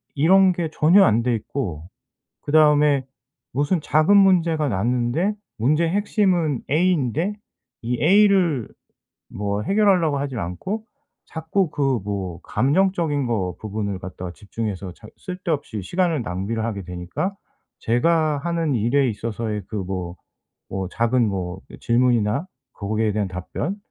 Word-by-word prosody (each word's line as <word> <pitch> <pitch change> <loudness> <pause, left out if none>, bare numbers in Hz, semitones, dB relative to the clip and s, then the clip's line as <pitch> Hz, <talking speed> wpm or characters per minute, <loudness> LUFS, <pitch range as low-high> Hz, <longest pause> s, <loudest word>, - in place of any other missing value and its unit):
이런 185 +5 +5
게 170 -2 -2
전혀 180 +6 +5
안 115 -4 +3
돼 120 -1 +1
있고 95 - -5 0.6
그다음에 150 -2 +4 0.5
무슨 145 +6 +1
작은 155 +8 +3
문제가 170 -6 +4
났는데 120 - 0 0.2
문제의 155 +8 +2
핵심은 185 - +1
A인데 165 - +1 0.5
이 120 +3 -2
A를 185 - +4 0.6
뭐 100 0 -3
해결하려고 185 - +2
하지를 135 -5 -3
않고 190 - -5 0.4
자꾸 160 +3 -1
그 135 -4 0
뭐 95 -5 -4
감정적인 155 -1 +1
거 95 -6 -1
부분을 100 -2 -4
갖다가 90 -1 -7
집중해서 100 -2 -5
작 105 +3 -14
쓸데없이 160 - -4
시간을 170 - 0
낭비를 100 +4 -3
하게 100 -4 -4
되니까 90 - -4 0.4
제가 155 +5 +2
하는 165 -1 -1
일에 125 +4 +2
있어서의 110 -1 -4
그 - - -7
뭐, 90 -2 -4 0.5
뭐 95 -1 -3
작은 115 +2 +1
뭐 95 -2 -4 0.2
질문이나 120 - +2 0.3
거기에 110 +1 -1
대한 105 -2 0
답변, 95 - -4
130 Hz, 270 characters per minute, -22 LUFS, 105-165 Hz, 0.6 s, 이런